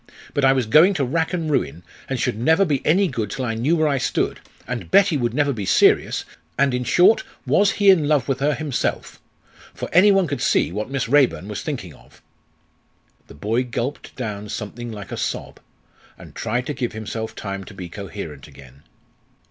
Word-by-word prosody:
But 145 - 0
I 135 - +6
was 130 -2 +1
going 155 - +5
to 140 -5 0
rack 160 +5 -1
and 170 -3 -2
ruin, 85 - -1 0.3
and - - -2
should - - 0
never 160 +10 +3
be 145 -6 -1
any 190 +5 +3
good 115 - -3
till 130 +2 -4
I 115 - -1
knew 125 +9 +1
where 155 -1 +2
I 140 -2 +1
stood - - -1 0.3
and 125 -1 -5
Betty 195 -3 +4
would 120 -4 -1
never 145 -1 +2
be 105 -4 -5
serious 95 - +3 0.3
and, 140 -1 +2
in 125 0 -1
short, 180 - +4 0.2
was 200 0 +3
he 200 -2 +5
in 160 -6 +2
love 145 -4 +2
with 135 -2 -1
her 145 +1 +1
himself? 150 -5 -3 0.5
for - - -5
any 200 +3 +7
one 195 -2 +3
could 145 -6 -4
see - - +2
what 105 +5 -4
Miss 135 -3 -2
Raeburn 120 - +2
was 105 -1 -5
thinking 120 - -5
of." - - -20 1.1
The - - -13
boy 110 - 0
gulped 125 +3 -5
down 105 -4 -5
something 115 +3 -6
like 105 -2 -9
a - - -4
sob, - - -4 0.6
and - - -13
tried 120 +3 -2
to 150 - -3
give 125 -4 -3
himself 110 +1 -5
time 100 -1 -5
to - - -12
be 90 -2 -7
coherent 85 -6 -8
again. 70 -1 -16
125 Hz, 200 wpm, -22 LUFS, 105-150 Hz, 1.1 s, any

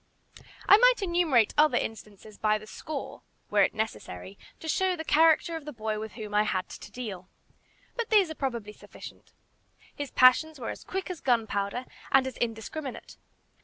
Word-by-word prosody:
I 405 - +9
might - - +5
enumerate 335 - +2
other 300 -5 +5
instances 215 -2 -6
by 215 0 +2
the 215 - -11
score, 285 +6 -7 0.3
were 205 -1 +4
it 195 - +2
necessary, 95 - -5 0.2
to 320 - -8
show 370 +3 +1
the 320 - -5
character 325 +1 +4
of 320 - -6
the 300 - -7
boy 215 -3 -3
with 220 0 -7
whom 215 -3 -8
I 210 - +4
had 190 -3 -1
to - - -10
deal. 200 -7 -7 0.7
But 470 -2 -3
these 400 -7 +4
are - - -3
probably 235 -8 -4
sufficient. - - -13 0.6
His 285 -2 -5
passions 285 +4 +4
were 235 - -4
as - - -9
quick 380 0 -4
as 350 - -8
gunpowder, 225 -1 0 0.3
and 270 -1 +5
as 260 -2 -5
indiscriminate. 240 +5 -5
250 Hz, 170 wpm, -28 LUFS, 215-315 Hz, 0.7 s, I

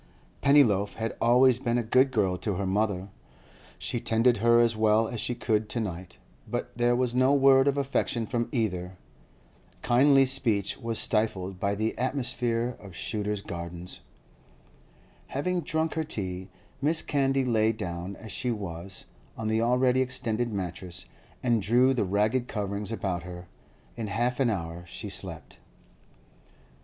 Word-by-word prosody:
Pennyloaf 110 -9 +4
had 115 0 -3
always 125 +1 +5
been 120 -2 0
a 120 - 0
good 130 +4 +4
girl 100 -7 +1
to 100 +2 -3
her 100 +2 -2
mother; 100 -1 0 0.7
she 120 - -3
tended 115 +2 +2
her 115 +2 +4
as 115 -1 +3
well 110 +1 +3
as 120 -1 -4
she 120 - -2
could 110 -2 0
to 120 - -2
night; 90 -4 -5 0.3
but - - -4
there 120 +1 +2
was 125 -1 0
no 130 +3 +4
word 135 0 +5
of 140 0 +2
affection 135 -4 0
from 120 +2 -2
either. 95 -6 -2 0.9
Kindly 135 +2 +5
speech 115 -7 +2
was 115 -3 -3
stifled 95 -4 -1
by 100 +1 0
the 110 +2 -1
atmosphere 125 -2 -1
of 95 -4 -12
Shooter's 105 0 -3
Gardens. 85 0 -7 1.3
Having 180 +6 -1
drunk 160 -1 -1
her 160 - -1
tea, 95 -9 -5 0.3
Mrs. 155 +3 +2
Candy 135 -2 +1
lay 110 -2 +3
down, 90 -3 -5
as 110 +1 -10
she 125 +6 -2
was, 95 -4 -5 0.3
on 110 -1 -2
the 110 +1 +1
already 125 +2 +3
extended 120 -2 -1
mattress, 90 -2 -5 0.4
and 120 -3 +2
drew 125 +6 +4
the 125 - 0
ragged 105 +6 +1
coverings 100 -1 -3
about 95 -6 -2
her. 90 0 -9 0.5
In 115 -2 -4
half 120 +5 -1
an 130 -3 +3
hour 85 -4 -4
she - - -6
slept. - - -6
115 Hz, 150 wpm, -27 LUFS, 100-125 Hz, 1.3 s, always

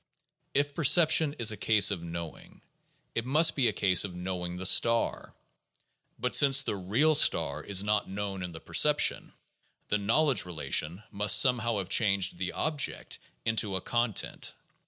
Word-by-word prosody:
If 145 +1 0
perception 155 -1 +3
is 115 -2 +3
a 105 - -8
case 105 -1 +3
of 95 -4 -5
knowing, 85 -1 -10 0.5
it 115 - -3
must 150 +6 +2
be 130 -4 +1
a - - +1
case 95 -3 +2
of 95 -3 -8
knowing 90 -1 -6
the 95 - -6
star; 115 +4 +2 0.8
but 125 +1 -2
since 135 -1 +5
the 105 - -4
"real" 110 +12 0
star 145 - +1
is 100 -1 0
not 105 0 -2
known 100 -1 -6
in 90 -1 -7
the 80 - -10
perception, - - +1 0.6
the 105 - -1
knowledge 130 +7 +1
relation 85 +1 -2
must 105 0 +3
somehow 120 -2 +1
have 95 -2 -5
changed 100 -5 +1
the 90 -1 -4
"object" 155 -3 -3 0.3
into 110 -3 -1
a 95 - -2
"content." 120 -3 -2
105 Hz, 155 wpm, -27 LUFS, 95-125 Hz, 0.8 s, since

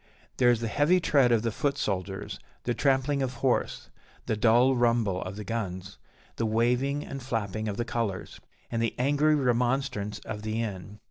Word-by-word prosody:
There 125 -1 +5
is 120 -2 +2
the 115 - -1
heavy 150 +10 +3
tread 140 -7 +3
of 115 -2 +3
the 115 - 0
foot 140 +5 -1
soldiers, 95 -3 -3 0.2
the 120 - 0
trampling 135 +2 +1
of 130 -1 -2
horse, 125 +1 -1 0.3
the - - 0
dull 120 +4 +4
rumble 115 -6 +2
of 95 +1 -5
the 105 - -6
guns, 95 -4 -5 0.4
the 115 - 0
waving 125 +6 +1
and 135 - -6
flapping 110 -4 -3
of 100 -1 -3
the 120 - -1
colours, 110 -7 -3 0.3
and 115 - -1
the 115 - -1
angry 145 +4 +3
remonstrance 125 -5 0
of 105 - -5
the 110 +1 -2
Inn. 105 -2 -5
115 Hz, 180 wpm, -28 LUFS, 105-130 Hz, 0.4 s, There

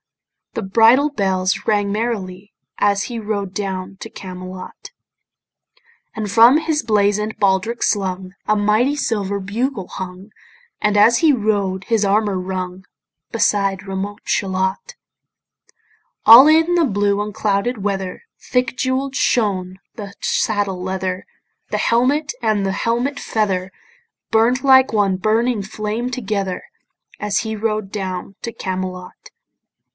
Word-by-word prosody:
The - - -3
bridle 230 +8 +4
bells 190 -6 0
rang 205 -1 +1
merrily 205 -4 -4 0.3
As 200 0 +2
he 240 -2 -5
rode 205 -3 -3
down 190 -1 -4
to - - -9
Camelot: 185 0 -9 1.3
And 215 -2 -3
from 230 +7 +6
his 315 -1 -1
blazon'd 210 0 +1
baldric 200 +4 +1
slung 185 -2 -1
A 215 - +3
mighty 215 +7 +2
silver 200 -6 -1
bugle 205 +1 -3
hung, 185 +2 -8 0.5
And 210 0 +2
as 225 +3 +5
he 320 -3 +5
rode 205 -6 0
his 225 -3 +1
armour 205 0 +1
rung, 185 0 -5 0.5
Beside 200 -4 +1
remote 195 +2 -4
Shalott. 190 - -1 1.3
All 240 +6 +10
in 320 +3 +4
the 340 - +3
blue 205 -5 +1
unclouded 210 +2 -1
weather 195 -2 -3 0.2
Thick 250 -1 -1
jewell'd 260 +1 -1
shone 190 -8 0 0.2
the 205 -4 -8
saddle 200 -4 -1
leather, 185 0 -3 0.4
The - - -1
helmet 280 +6 +1
and 215 -3 +1
the 195 - -1
helmet 245 +7 -1
feather 195 -4 -1 0.6
Burn'd 235 +4 +2
like 265 -1 +6
one 205 -3 +2
burning 220 +4 +1
flame 215 +4 -4
together, 200 -6 -3 0.6
As 210 -1 0
he 220 -1 -4
rode 215 -2 -2
down 190 -1 -5
to 230 - -4
Camelot. 185 -2 -6
205 Hz, 125 wpm, -19 LUFS, 190-230 Hz, 1.3 s, All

